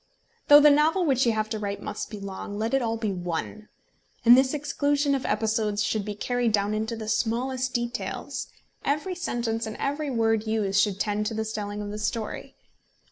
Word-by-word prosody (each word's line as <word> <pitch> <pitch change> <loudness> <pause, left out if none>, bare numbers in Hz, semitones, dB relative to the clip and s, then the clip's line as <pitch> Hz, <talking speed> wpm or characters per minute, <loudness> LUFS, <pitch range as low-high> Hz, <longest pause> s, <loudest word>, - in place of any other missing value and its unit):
Though 290 0 +10
the 295 0 +7
novel 315 +5 +3
which 265 -4 +2
you 230 - +3
have 215 0 -1
to 220 - -2
write 200 -1 -3
must 210 +1 -5
be 210 - -7
long, 200 +1 -6
let 225 +4 -2
it 270 - +4
be - - -3
all 225 0 -1
one. 195 0 -4 0.6
And 240 +1 +10
this 265 +2 +3
exclusion 290 0 0
of 270 - -1
episodes 215 -1 0
should 210 -2 -1
be 210 -1 -4
carried 245 +1 0
down 205 0 +1
into 220 +2 -2
the 220 -1 -7
smallest 255 +4 -1
details. 240 +1 -3 0.4
Every 300 +6 -1
sentence 235 -9 -2
and 220 - -6
every 290 +1 -2
word 225 -3 +1
used 205 -3 +2
should 200 -1 0
tend 210 0 0
to 225 - -3
the 220 0 -2
telling 210 -1 -4
of 205 - -5
the 210 - -5
story. 215 +1 -4
225 Hz, 195 wpm, -26 LUFS, 210-260 Hz, 0.6 s, Though